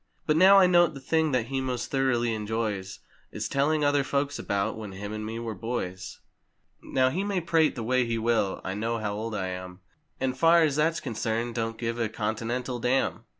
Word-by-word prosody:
But 150 - +2
now 190 +4 +7
I 195 - +7
note 175 -3 +4
the - - -7
thing 160 +3 +1
that 125 -4 +1
he 135 -1 -1
most 125 -2 -3
thoroughly 120 -4 +1
enjoys 105 -3 -3 0.3
Is - - -4
telling 150 +2 +1
other 145 -1 +3
folks 140 +1 -1
about, 100 +2 -1
"When 105 -3 -7
him 100 +2 -6
and 110 0 -4
me 110 +1 -5
were 115 -1 -4
boys!" 95 -6 -5 0.6
Now 130 -1 +1
he 185 +7 -1
may 200 -2 -1
prate 165 -2 +2
the 120 - -4
way 125 +1 +1
he 115 0 -1
will, 115 -4 0
I 95 - -3
know 115 +3 -2
how 105 -2 -3
old 110 +1 -4
I 95 -2 -2
am, 90 0 -7 0.4
And 130 -1 -1
far 165 +4 +5
as 150 -3 +1
that's 165 +3 +1
concerned 115 -1 -2
don't 115 -1 -3
give 115 0 -3
a 115 -2 0
Continental 120 +4 -3
dam. 125 +3 0
120 Hz, 205 wpm, -27 LUFS, 110-140 Hz, 0.6 s, now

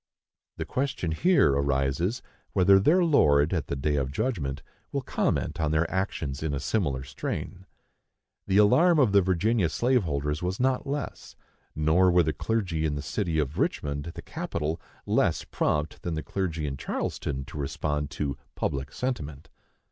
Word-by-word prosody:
The - - -3
question 130 -11 -2
here 165 - +4
arises, 70 - 0 0.3
whether 95 +1 +6
their 170 - +4
Lord, 75 - +4
at 80 -5 -1
the - - -2
day 75 +2 0
of 65 -1 -1
judgment, 70 - -2 0.3
will - - -2
comment - - -1
on 80 - +1
their 80 +2 +2
actions 80 -7 -2
in 75 -2 -1
a - - -2
similar 70 -6 -1
strain. 70 +6 -5 0.8
The 95 0 +2
alarm 165 +12 +5
of 130 -8 +4
the 100 0 +6
Virginia 95 +1 +2
slave 125 +5 +2
holders 75 -1 -2
was 90 +2 -2
not 130 +1 +1
less; 140 0 -5 0.4
nor 80 +5 +4
were 90 0 +5
the 80 0 0
clergy 90 -3 -1
in 75 -2 0
the 70 - -4
city 85 +1 -2
of 75 -1 -1
Richmond, 70 0 -1
the - - -8
capital, 75 +2 -3 0.2
less - - +1
prompt 75 +1 -1
than 85 -2 -3
the 80 - -3
clergy 80 -2 -2
in 70 -2 -3
Charleston 65 +1 -3
to 75 - -8
respond 75 +1 -2
to 75 -2 -3 0.2
"public 70 -1 -2
sentiment." 75 - -4
80 Hz, 165 wpm, -27 LUFS, 70-100 Hz, 0.8 s, whether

